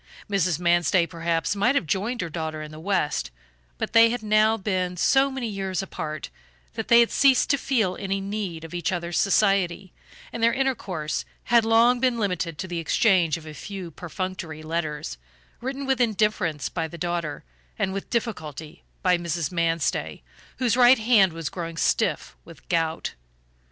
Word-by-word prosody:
Mrs. 185 -5 +1
Manstey, 175 0 +3
perhaps, 165 +2 -1
might 240 +7 +2
have 235 - +1
joined 205 - -1
her 170 - -3
daughter 155 -1 -4
in 150 - -9
the 155 - -10
West, 175 -4 -1 0.5
but - - -4
they 230 0 +7
had 240 -1 -3
now 215 +1 +3
been 185 -3 -2
so 270 +9 +4
many 265 -3 -4
years 195 -2 -3
apart 155 -5 -6 0.4
that - - -4
they 235 0 +7
had 235 - +2
ceased 270 -2 +4
to 280 - +3
feel 220 -10 0
any 195 +1 -2
need 195 -4 -4
of 165 +1 -9
each 175 +1 -1
other's 170 -1 -2
society, 195 -2 +2 0.4
and 230 - -4
their 230 0 +4
intercourse 195 - -2 0.2
had 235 -1 +4
long 230 +2 +4
been 250 -1 +1
limited 180 -6 -2
to 190 - -5
the 175 -1 -3
exchange 170 -1 +2
of 160 - -12
a 155 - -8
few 190 0 -7
perfunctory 170 -2 -6
letters, 155 - -3 0.4
written 270 +2 -4
with 265 -2 +1
indifference 210 - +1
by 165 -2 -3
the 170 - -10
daughter, 170 -2 -3 0.3
and 190 - -1
with 195 - -5
difficulty 160 - -4 0.2
by 180 -1 +3
Mrs. 170 -2 -2
Manstey, 165 -2 -1 0.3
whose 245 -3 +1
right 250 +1 +7
hand 220 -5 +4
was 165 -1 -5
growing 165 0 -5
stiff - - 0
with - - -15
gout. 165 -1 -1
185 Hz, 170 wpm, -25 LUFS, 165-225 Hz, 0.5 s, they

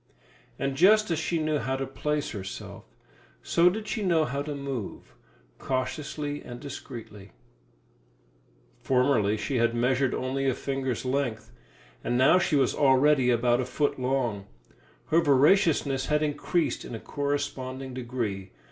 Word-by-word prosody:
And 135 0 -2
just 210 +5 +5
as 160 - 0
she 165 +2 -1
knew 155 -1 0
how 130 +2 -2
to 135 0 -2
place 150 +2 -2
herself, 95 -3 -7 0.6
so 170 +1 +4
did 215 +3 -5
she 220 - -2
know 170 -5 +2
how 140 0 -3
to 145 0 -4
move 135 -7 -6 0.5
cautiously 145 +3 -3
and 120 0 -9
discreetly. 115 -8 -9 1.5
Formerly 125 -5 +2
she 115 +5 -2
had 115 0 +2
measured 125 +2 +1
only 135 +1 -1
a 130 - 0
finger's 135 -3 -3
length, 120 -5 -2 0.5
and 120 - 0
now 135 +8 +5
she 175 - +1
was 135 -3 +3
already 135 -1 +4
about 120 +1 +2
a - - -2
foot 135 +3 -1
long; 125 -6 -1 0.6
her 165 +2 +4
voraciousness 145 -2 +3
had 150 0 +1
increased 155 +3 -1
in 120 - -7
a - - -6
corresponding 135 -2 -3
degree. 115 -6 -4
135 Hz, 140 wpm, -27 LUFS, 125-150 Hz, 1.5 s, just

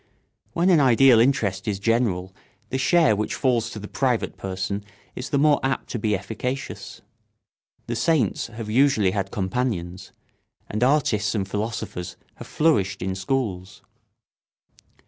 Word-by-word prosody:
When 180 +3 +3
an 170 - +5
ideal 130 -2 +6
interest 115 -7 +1
is 100 -2 0
general 100 -4 0 0.4
the 130 - -2
share 160 -3 +4
which 105 +1 -2
falls 120 -3 +1
to 115 - -8
the 105 0 -7
private 125 -2 -1
person 95 +1 -4 0.3
is 125 - -6
the 145 - +1
more 145 0 +4
apt 135 0 -2
to 120 - -3
be 105 -1 +1
efficacious. 125 +7 -5 0.8
The 120 - -3
saints 155 +4 +1
have 115 -1 -8
usually 115 -4 +3
had 100 -1 -2
companions, 95 -3 -3 0.6
and 110 +3 -2
artists 125 -7 +2
and 95 -3 -1
philosophers 105 -4 -4 0.2
have - - -10
flourished 145 - +1
in 95 0 -2
schools. 95 -2 -3
115 Hz, 140 wpm, -24 LUFS, 100-135 Hz, 0.8 s, ideal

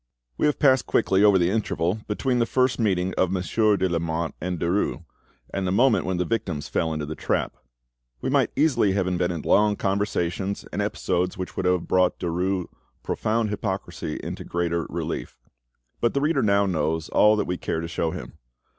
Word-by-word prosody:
We - - +2
have 150 - +1
passed 130 -3 +4
quickly 95 +1 +2
over 100 -2 +6
the 90 0 +2
interval 105 -2 0
between 125 +4 0
the 115 - +2
first 130 -1 +1
meeting 95 -4 +1
of 95 - +3
Monsieur 100 +3 +2
de 95 0 +1
Lamotte 85 -2 -2
and 90 +1 -2
Derues, 85 -2 0 0.5
and 95 -1 -1
the - - 0
moment 115 0 +3
when 95 -1 -1
the 90 - 0
victims 90 -10 -2
fell 80 - -1
into 75 -1 -3
the 75 - -5
trap: - - -1 0.6
we - - -4
might - - +2
easily 135 -10 +3
have 95 -1 +1
invented 90 -3 -1
long 105 0 +4
conversations, 100 -1 -1
and 100 - -1
episodes 90 -3 -1
which 95 -1 -5
would 95 - -1
have 90 -1 +1
brought 90 -1 +2
Derues' 90 +1 -1 0.4
profound 110 0 0
hypocrisy 100 -2 -4
into - - -5
greater 85 -1 -1
relief; - - -4 0.6
but 120 - +1
the 140 - +2
reader 150 -1 +2
now 100 -1 +3
knows 80 -3 -1
all 105 0 +5
that 105 - 0
we 90 0 -2
care 80 - -2
to 85 - -4
show 85 -1 -1
him. - - -8
95 Hz, 185 wpm, -24 LUFS, 85-105 Hz, 0.6 s, over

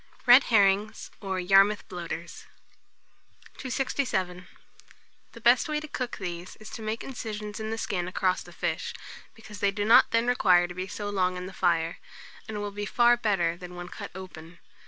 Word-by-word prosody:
RED 250 +2 +8
HERRINGS, 205 -1 +2
or 190 -2 -2
YARMOUTH 195 +3 +4
BLOATERS. 170 -2 -7 1.1
267. 235 -9 -2 0.9
The 235 - -12
best 245 +7 +4
way 300 0 0
to 310 - -8
cook 255 -4 -4
these 175 -2 -6
is 215 - -12
to - - -7
make 220 +1 -3
incisions 215 -5 -6
in 220 0 -4
the 225 - -3
skin 200 -6 -2
across 185 0 0
the - - -12
fish, - - -3 0.4
because 220 -2 -11
they 200 - +2
do 205 +1 -2
not 225 +3 +7
then 230 +1 +2
require 180 -8 +4
to 180 - -8
be 185 +1 -5
so 205 +1 -5
long 185 -2 0
on 180 - -5
the 190 - -8
fire, 165 -1 0 0.5
and 220 - -5
will 205 0 -4
be 205 0 -5
far 240 0 +4
better 195 -8 0
than 180 0 -10
when 175 0 -7
cut - - -8
open. 175 -3 -10
205 Hz, 175 wpm, -27 LUFS, 180-225 Hz, 1.1 s, RED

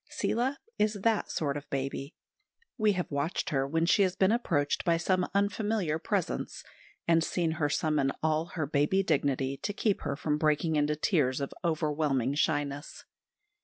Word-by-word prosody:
Seela 255 +5 -1 0.2
is 210 0 +2
that 225 -2 +2
sort 145 -3 -1
of 145 -1 -7
baby. 135 +2 -3 0.6
We 215 -4 +3
have 180 -3 -3
watched 145 +5 -1
her 135 -2 +1
when 165 +3 +1
she 175 - +4
has 185 -2 +2
been 190 +1 +3
approached 165 -12 0
by 170 -1 +3
some 185 +2 +1
unfamiliar 200 -5 0
presence, - - -2 0.4
and 165 -1 +4
seen 165 -1 0
her 155 -2 0
summon 150 -2 +1
all 160 0 +2
her 160 -4 0
baby 150 +7 +2
dignity 140 -4 0
to 205 - -3
keep 205 0 0
her 140 - -2
from 150 +1 -1
breaking 155 +1 +2
into 150 0 +2
tears 145 -5 +1
of 140 - -4
overwhelming 150 -5 0
shyness. 145 -1 -1
155 Hz, 165 wpm, -29 LUFS, 145-185 Hz, 0.6 s, she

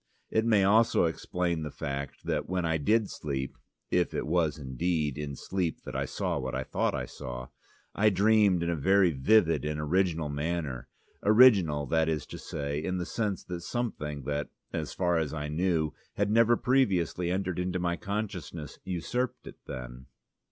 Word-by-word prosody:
It 110 0 +2
may 110 -4 +4
also 110 +4 +4
explain 85 0 -1
the 75 - -4
fact 70 -1 -5
that - - -1
when 90 -2 0
I 80 -1 +1
did 110 +8 +2
sleep 70 -6 -4 0.4
(if 90 -1 +1
it - - -1
was 80 -1 +1
indeed 75 +2 -1
in 75 -2 -4
sleep 90 +2 -2
that - - -7
I - - 0
saw - - -2
what 65 0 -3
I 65 - -1
thought - - 0
I - - -2
saw) 60 0 -7 0.4
I 110 +1 +4
dreamed 100 -2 +4
in 85 - 0
a - - 0
very 95 +4 +4
vivid 80 +5 +3
and 75 0 -2
original 80 0 +1
manner, 70 -3 -3 0.3
original, 100 - +6
that 80 +4 +2
is 75 -3 -1
to - - -9
say, 70 +1 -3
in 90 +1 -1
the 90 - -2
sense 105 -2 -2
that 90 -1 -6
something 80 - -3
that, 75 +2 -2 0.2
as - - -3
far 90 -2 +1
as 80 -1 -2
I 75 -1 -3
knew, 80 -1 0 0.2
had 100 0 +1
never 115 +1 +5
previously 95 -9 +1
entered 90 -1 -1
into 90 0 -1
my 85 -1 0
consciousness, 90 -6 -5
usurped 105 +8 -2
it - - -11
then. 65 0 -7
85 Hz, 175 wpm, -29 LUFS, 75-95 Hz, 0.4 s, original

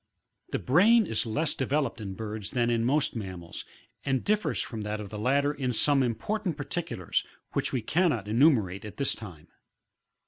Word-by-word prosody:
23. - - -1
The - - -14
brain 210 - +6
is 115 -7 -1
less 150 +7 0
developed 135 -3 -1
in 95 -2 -5
birds 105 -2 -5
than 120 -1 +1
in 115 -1 +1
most 140 +4 +2
mam 95 -5 -5
mals, 85 - -7 0.4
and 135 -2 0
differs 210 +1 +1
from 115 -3 -3
that 105 0 -3
of 100 -2 -7
the 105 - -5
latter 140 +5 +2
in 130 -4 -2
some 140 +4 +3
important 170 - -1
particulars, 145 - -2 0.3
which - - 0
we 125 -4 -1
cannot 150 - +1
enumerate 110 - +3
at 105 - -9
this 140 - +1
time, 90 -8 -9
24. - - -34
125 Hz, 185 wpm, -28 LUFS, 105-150 Hz, 0.4 s, brain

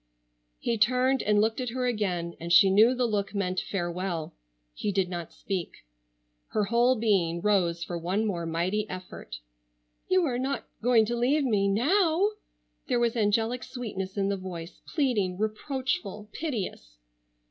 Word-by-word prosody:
He 230 -2 -1
turned 255 +3 +3
and 210 0 +3
looked 220 +4 +1
at 250 - -2
her 250 +1 -2
again 185 -8 -1
and 170 +1 -5
she 190 +3 +7
knew 220 +6 +6
the 250 0 +1
look 205 -3 -1
meant 185 -2 0
farewell. 175 -3 -3 0.4
He 205 - -2
did 190 -2 +1
not 175 -2 -5
speak. 185 - -5 0.6
Her 215 - 0
whole 240 +4 +3
being 195 -7 +1
rose 175 -4 +1
for 170 0 -4
one 190 +6 0
more 170 -5 -2
mighty 185 +6 -1
effort. 185 - -8 0.7
"You 370 -1 +4
are 250 -4 -1
not 270 +2 -2 0.2
going 230 -1 +4
to 240 +2 -2
leave 265 +5 +2
me—now?" 285 - +3 0.6
There 245 -3 +1
was 235 -1 +1
angelic 225 +3 +1
sweetness 205 -6 -5
in 195 0 +1
the 200 - 0
voice, 175 -3 -8
pleading, 220 - 0
reproachful, 215 -1 -3
piteous. 195 - -4
210 Hz, 150 wpm, -28 LUFS, 185-245 Hz, 0.7 s, she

